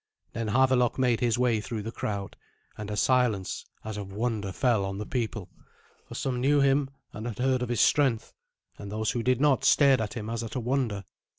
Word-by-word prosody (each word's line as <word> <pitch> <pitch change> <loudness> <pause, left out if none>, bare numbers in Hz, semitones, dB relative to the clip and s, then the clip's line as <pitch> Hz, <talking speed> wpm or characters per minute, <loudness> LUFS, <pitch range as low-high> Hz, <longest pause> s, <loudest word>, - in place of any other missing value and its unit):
Then 115 0 -3
Havelok 125 +1 +3
made 125 -3 +2
his 120 -2 +1
way 120 -3 +2
through 110 -1 -5
the 115 - -5
crowd, 100 -4 -4 0.4
and 105 0 -7
a 105 - -3
silence 120 -6 +1 0.2
as 110 -1 -5
of 100 -1 -6
wonder 105 -2 -2
fell 115 -1 +1
on 95 0 -4
the 105 - -4
people; 110 -6 -3 0.6
for - - -9
some 125 -2 -2
knew 145 +2 +3
him, 140 0 +3 0.2
and 110 +2 -6
had 115 - -5
heard 130 0 +1
of 125 - -2
his 120 - +1
strength, 135 -7 +2 0.5
and 100 -1 -7
those 110 +1 -1
who 120 - -2
did 125 +1 +1
not 145 -2 +3
stared 140 -4 +5
at 105 +2 -4
him 110 -3 -5
as 115 0 -3
at 115 +2 -7
a - - 0
wonder. 120 -5 -1
115 Hz, 210 wpm, -27 LUFS, 105-130 Hz, 0.6 s, stared